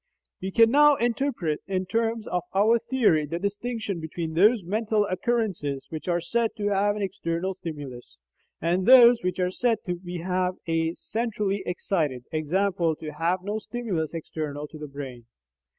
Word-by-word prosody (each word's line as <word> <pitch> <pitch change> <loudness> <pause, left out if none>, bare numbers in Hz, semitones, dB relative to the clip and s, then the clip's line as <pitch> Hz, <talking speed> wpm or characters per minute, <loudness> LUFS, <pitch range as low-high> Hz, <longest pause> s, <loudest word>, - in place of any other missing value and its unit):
We 190 - -2
can 230 +3 +5
now 295 +1 +6
interpret 235 - -1
in 190 -1 -1
terms 225 +3 -1
of 180 - -1
our 220 +4 +4
theory 230 - +2
the 165 +3 -3
distinction 205 0 -3
between 160 0 -5
those 205 +5 +4
mental 210 +3 0
occurrences 185 - -1
which 160 +1 -6
are 175 -1 +2
said 225 +6 -1
to 205 -1 0
have 205 +1 +2
an 210 - -3
external 190 -1 -2
stimulus, 140 - -8 0.4
and 175 +3 0
those 245 -2 +8
which 180 +1 -2
are 180 0 +1
said 235 +3 +1
to 180 - -1
be 175 -1 -7 0.7
"centrally 210 -3 -2
excited," 155 -8 -1
i.e. 155 - 0
to 170 -3 0
have 175 +3 0
no 205 +2 -2
stimulus 205 -10 -3
external 150 -2 -4
to 155 - -11
the 150 - -6
brain. 135 -4 -8
190 Hz, 155 wpm, -26 LUFS, 165-220 Hz, 0.7 s, those